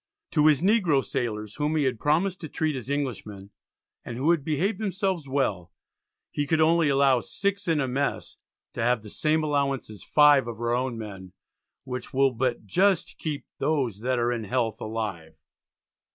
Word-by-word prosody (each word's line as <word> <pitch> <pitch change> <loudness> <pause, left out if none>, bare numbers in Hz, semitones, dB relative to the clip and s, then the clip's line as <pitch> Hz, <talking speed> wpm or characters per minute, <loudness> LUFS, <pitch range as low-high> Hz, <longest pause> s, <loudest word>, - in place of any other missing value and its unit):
To 150 0 +4
his 150 -3 +4
Negro 180 - +3
sailors, 110 -6 -3
whom 150 +1 0
he 155 - +2
had 130 -4 0
promised 175 +6 +1
to 160 - -6
treat 155 0 -1
as 130 0 -6
Englishmen, 105 -8 -4 0.5
and 120 - -6
who 145 +6 +3
had 165 -5 +1
behaved 165 +9 0
themselves 190 -7 -2
well, 110 -11 -1 0.6
he 145 -1 -2
could 160 +1 +2
only 160 0 +4
allow 135 -2 +4
6 200 - -3
in 165 -2 +2
a 135 - 0
mess 135 +3 -2 0.4
to - - -4
have 120 -1 +1
"the 105 - -10
same 155 +1 +1
allowance 140 -5 -1
as 105 - -11
5 145 -4 +5
of 115 -2 -6
our 120 0 0
own 125 -1 -1
men, 95 -4 -8 0.5
which 125 0 -6
will 135 0 +4
but 125 -2 -2
just 185 - +1
keep 150 -3 -4
those 130 -10 0
that 125 +1 0
are 120 0 +1
in 115 -3 -3
health 115 +1 -1
alive." 105 -8 -4
135 Hz, 180 wpm, -26 LUFS, 115-155 Hz, 0.6 s, 5